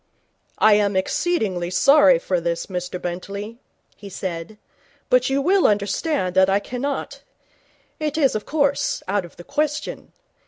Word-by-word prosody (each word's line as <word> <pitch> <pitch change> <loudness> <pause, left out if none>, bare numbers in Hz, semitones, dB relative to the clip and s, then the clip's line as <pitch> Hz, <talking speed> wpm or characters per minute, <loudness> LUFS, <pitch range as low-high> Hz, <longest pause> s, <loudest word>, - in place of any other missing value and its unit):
'I 215 - +5
am 205 -1 +2
exceedingly 190 - -1
sorry 275 +7 +5
for 185 -8 -2
this, 170 0 -2
Mr 180 -1 -5
Bentley,' 200 +6 -6 0.4
he 200 - -11
said, 185 +1 -6 0.5
'but - - +4
you 275 +1 0
will 380 +3 +4
understand 205 - 0
that 190 0 +5
I 195 - +3
cannot 255 +6 -4 0.8
It 305 0 -2
is, 275 -5 +3
of 215 - -3
course, 285 -2 0
out 195 -1 0
of 170 - -15
the 175 - -10
question. 295 - -3
210 Hz, 145 wpm, -22 LUFS, 185-285 Hz, 0.8 s, I